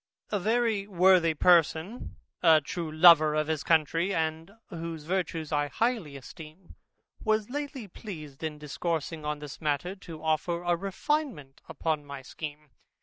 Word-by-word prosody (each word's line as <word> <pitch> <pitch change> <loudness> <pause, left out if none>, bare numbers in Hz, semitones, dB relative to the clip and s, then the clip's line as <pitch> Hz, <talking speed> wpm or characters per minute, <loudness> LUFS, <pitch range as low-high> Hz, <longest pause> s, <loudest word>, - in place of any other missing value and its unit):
A 205 - +1
very 220 -1 +1
worthy 180 -3 +4
person, 175 +5 +2 0.3
a 160 -3 +7
true 165 +1 -5
lover 155 -1 +7
of 155 0 +1
his 155 -1 -2
country, 165 +4 +2
and 160 +1 -2 0.2
whose 165 -2 -6
virtues 165 -2 -2
I 145 -1 +1
highly 215 - -1
esteem, 155 +6 -12 0.5
was 215 0 0
lately 280 -5 -5
pleased 155 - -9
in 155 -1 -3
discoursing 155 +1 -3
on 150 0 -2
this 145 0 -9
matter, 155 +5 -1
to 165 -4 -10
offer 165 +2 0
a 175 0 +2
refinement 195 - -3
upon 155 -2 -2
my 140 -2 -8
scheme. 150 +1 -8
165 Hz, 145 wpm, -28 LUFS, 155-190 Hz, 0.5 s, a